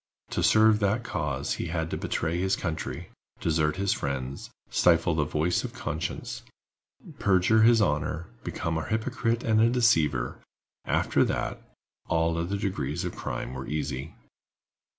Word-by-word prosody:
To - - 0
serve 110 -1 +5
that 105 +3 +1
cause 75 - -2
he - - -3
had 80 -1 -2
to - - -1
betray 85 +2 -1
his 95 +2 +2
country, 85 -5 -4 0.3
desert 75 -2 +1
his 100 0 +1
friends, 70 0 -4 0.2
stifle 85 0 +4
the 75 -1 +1
voice 80 +4 0
of - - -6
conscience, - - -4 0.8
perjure 100 +3 +4
his 115 0 +6
honor, 75 0 -1 0.2
become 80 -1 -2
a - - -5
hypocrite 115 +1 0
and 110 -1 +3
a 115 - +5
deceiver: 80 - +2 0.5
after - - +2
that, - - -2 0.5
all 80 0 +1
other 85 +4 -1
degrees 85 -4 -2
of 90 - -4
crime - - -4
were 65 0 -6
easy. 70 0 -3
85 Hz, 145 wpm, -27 LUFS, 75-100 Hz, 0.8 s, his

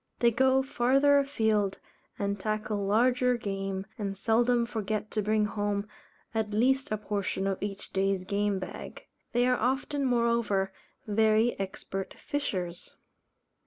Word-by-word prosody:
They 235 -1 +4
go 265 +3 +3
farther 275 +3 +4
afield, 220 -8 +1 0.4
and 200 -1 -2
tackle 215 -1 -2
larger 250 +3 +3
game, 195 -3 -3
and 200 -2 -3
seldom 235 +3 +2
forget 215 -2 -3
to 215 - 0
bring 210 +1 +2
home 205 -1 -2 0.5
at 220 -2 0
least 265 +5 +2
a 215 - +1
portion 200 -2 -2
of 195 -1 -1
each 200 0 -5
day's 195 -1 +1
game 200 +1 0
bag. 185 -1 -7 0.3
They 245 +1 +3
are 250 0 +3
often, 270 +4 0
moreover, 235 -6 +1 0.3
very 220 +2 +3
expert 195 0 -5
fishers. 185 -12 -4
215 Hz, 130 wpm, -29 LUFS, 200-245 Hz, 0.5 s, They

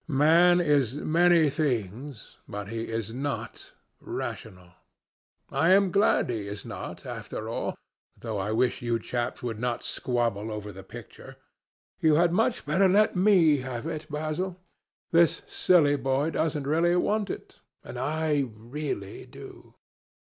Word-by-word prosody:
Man 165 +5 +5
is 145 -7 +2
many 170 +1 +4
things, 125 - -3
but 100 0 -6
he 115 +1 -3
is 115 -1 -4
not 140 +3 -5 0.3
rational. 90 -2 -7 0.8
I 165 - +2
am 195 -1 +4
glad 200 +3 +3
he 105 -4 -4
is 100 0 -7
not, - - -7
after - - -6
all—though 110 -3 -6
I 100 +2 -2
wish 120 +3 +1
you 120 -1 0
chaps 120 +2 -4
would 115 -3 -4
not 120 0 -2
squabble 115 -4 -1
over 105 -1 -6
the 95 0 -10
picture. 110 +3 -12 0.6
You 155 -2 +4
had 170 +2 +4
much 225 +5 +1
better 185 +6 +3
let 205 +3 +3
me 180 -6 +5
have 130 -1 -5
it, 155 -1 -5
Basil. 155 +5 -3 0.5
This 170 -1 +3
silly 150 -6 +3
boy 135 +3 0
doesn't 155 -4 -1
really 165 +4 +2
want 205 +3 +1
it, - - -8 0.2
and 125 - -8
I 150 0 0
really 115 -3 -6
do." - - -13
145 Hz, 140 wpm, -27 LUFS, 115-165 Hz, 0.8 s, Man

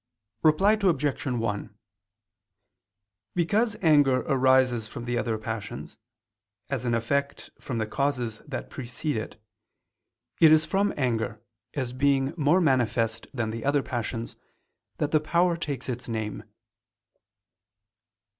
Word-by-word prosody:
Reply 160 +7 +5
Obj. 150 -7 +1
1: 115 -4 -2 1.6
Because 210 +6 +1
anger 145 -5 +5
arises 130 -4 +3
from 120 +2 -7
the 120 0 -1
other 115 -2 0
passions, 110 -2 -6 0.8
as - - -2
an 120 -1 +1
effect 140 +5 -2
from 125 -4 -4
the 110 - 0
causes 125 -2 -1
that 135 -3 -5
precede 130 +3 -4
it, 110 0 -5 1.0
it 160 -2 +8
is 155 0 +6
from 195 +5 +1
anger, 115 -5 -1 0.4
as 130 -4 -2
being 135 +1 +2
more 155 +3 +3
manifest 120 -7 +1
than 115 -4 -2
the 115 0 -5
other 145 +1 +2
passions, 115 -1 -4 0.6
that 150 - -1
the 155 - +4
power 170 +3 +2
takes 145 -6 -4
its 125 -1 -4
name. 110 -2 -4
130 Hz, 120 wpm, -27 LUFS, 115-150 Hz, 1.6 s, it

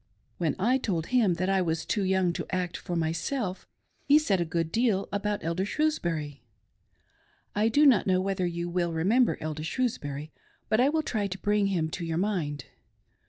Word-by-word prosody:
When 160 -5 0
I 245 +7 +2
told 170 -9 -2
him 215 -8 +4
that 185 +2 -1
I 195 -1 +2
was 165 -2 -1
too 210 - 0
young 190 -2 +2
to - - -5
act 180 -2 -2
for 180 - -4
myself 180 - -2 0.4
he 285 +1 +7
said 200 - +1
a - - 0
good 165 0 -2
deal 220 -3 +1
about 205 0 -2
Elder 170 +3 -1
Shrewsbury. 170 - -1 1.1
I 215 +2 +2
do 290 +6 +4
not 255 -9 +5
know 185 -1 +3
whether 190 -1 -1
you 170 0 -3
will 175 -1 -1
remember 215 +10 +2
Elder 155 0 -4
Shrewsbury 155 - -3 0.4
but 215 - +3
I 260 +3 +5
will 315 +1 0
try 215 -8 -1
to 190 0 -5
bring 205 +1 +1
him 175 -5 0
to 175 - -4
your 165 -1 -2
mind. 175 -7 -1
185 Hz, 185 wpm, -28 LUFS, 165-215 Hz, 1.1 s, he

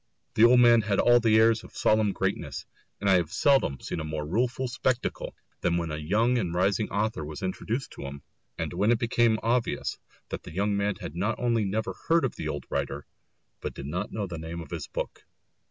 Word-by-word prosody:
The 110 - +6
old 125 +1 +7
man 120 -1 +7
had 100 -2 0
all 120 0 +6
the 110 -2 +4
airs 115 0 +4
of - - -13
solemn 110 -1 +3
greatness, - - -3 0.3
and 100 - -2
I 95 -1 +6
have 85 -2 -1
seldom 135 - +3
seen - - -4
a - - -3
more 75 -1 -4
rueful 120 +9 0
spectacle 125 0 -2 0.3
than 85 0 +1
when 85 -2 -2
a 75 - -3
young 110 +11 +2
and 90 -5 -2
rising 100 +3 +1
author 105 -5 -1
was 75 +6 -7
introduced 110 +7 -3
to - - -7
him, 70 +1 -8 0.3
and - - -3
when 105 - +1
it 120 - +4
became 115 -1 +2
obvious 120 +1 0 0.3
that - - -4
the - - -11
young 100 +2 +1
man 100 0 0
had 85 -2 -8
not 105 +6 -1
only 115 -3 +1
never 110 +3 -2
heard 165 -3 +4
of 130 - -3
the 80 - -4
old 75 -1 -4
writer, - - -2 0.5
but - - -5
did 70 - -7
not 85 +6 -3
know 105 -1 -2
the 85 -3 -6
name 80 +1 -6
of 85 - -9
his 85 -4 -4
book. - - -5
105 Hz, 220 wpm, -27 LUFS, 85-115 Hz, 0.5 s, old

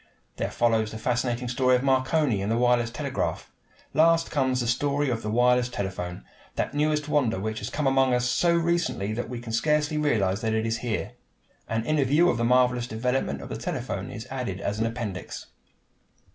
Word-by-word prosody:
There - - -1
follows 115 -2 +1
the 110 - -7
fascinating 120 +1 -1
story 125 +1 +3
of 125 - 0
Marconi 130 -3 +2
and 100 +3 -1
the 115 - +1
wireless 120 -1 +3
telegraph. 120 - -3 0.4
Last 165 +2 +3
comes 130 -4 +1
the 120 - -1
story 140 +3 0
of 115 -2 -2
the 105 - -4
wireless 125 +2 +3
telephone, 95 -5 -5 0.3
that - - -2
newest 150 0 0
wonder 130 -9 +1
which 110 +2 -3
has 105 - -5
come 150 - -2
among 135 -1 +3
us 125 0 +1
so 170 +7 +2
recently 170 -11 0
that 120 +1 -4
we 125 -1 -5
can 115 -1 -7
scarcely 150 +5 +1
realize 105 -10 +1
that 110 -1 0
it 110 0 0
is 115 0 -1
here. 115 -2 -3 0.6
An 115 0 -1
inner 155 0 +2
view 150 +7 +4
of - - -2
the 120 - -1
marvelous 125 0 +3
development 110 - -1
of - - -9
the - - -4
telephone - - -4
is - - -7
added - - -3
in - - -4
an 115 - +1
appendix. 115 -5 -5
125 Hz, 195 wpm, -26 LUFS, 115-140 Hz, 0.6 s, view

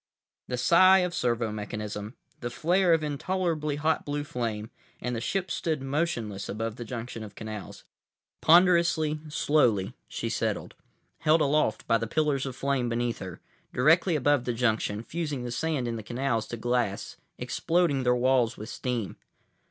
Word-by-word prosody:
———— - - -66
The 125 - -2
sigh 185 +9 +6
of 175 - -4
servo 120 -5 0
mechanism, 105 +1 -5 0.2
the 120 - -3
flare 175 +8 +2
of 165 -1 +3
intolerably 155 0 -1
hot 155 +2 +1
blue 145 0 -2
flame, 115 -6 -4 0.3
and 125 0 -3
the 115 - -3
ship 190 +8 -2
stood 155 -5 -1
motionless 135 - -2
above 110 +2 -3
the 120 - -6
junction 115 0 -6
of 105 -2 -10
canals. 110 -2 -7 0.6
Ponderously, 170 -3 +4
slowly, 125 -10 +2
she - - -4
settled; - - -2 0.5
held 160 +1 +4
aloft 145 -6 +1
by 115 0 +3
the 115 - -3
pillars 145 0 0
of 130 - -5
flame 135 -3 0
beneath 120 0 -1
her, 95 -2 -8 0.3
directly 160 +6 +4
above 145 -2 +2
the 120 - 0
junction, 110 -2 0
fusing 150 -3 -3
the 120 - -4
sand 145 -1 -1
in 115 -1 -2
the - - -5
canals 120 0 -1
to 120 - -5
glass, 120 -3 -1 0.2
exploding 165 -5 +1
their 125 -1 +3
walls 125 -2 +2
with 110 +2 -7
steam. 120 -7 -3
125 Hz, 160 wpm, -28 LUFS, 115-155 Hz, 0.6 s, sigh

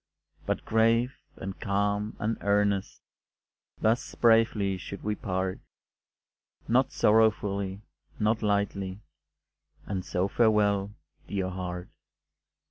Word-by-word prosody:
But - - -1
grave, 115 +3 +3 0.2
and 95 0 -7
calm, 105 0 0
and 110 +2 -1
earnest, 100 -1 +1 0.8
Thus 110 +2 0
bravely 110 -4 +3
should 100 +3 -8
we 105 - 0
part, 95 -2 -2 1.1
Not 130 +3 +3
sorrowfully, 105 -2 +2 0.3
not 110 +2 +1
lightly, 100 -2 -1 0.8
And 95 -2 -3
so 90 +2 0
farewell, 105 -2 +2 0.3
dear 95 -2 -2
heart. 90 -1 -5
100 Hz, 95 wpm, -28 LUFS, 95-110 Hz, 1.1 s, grave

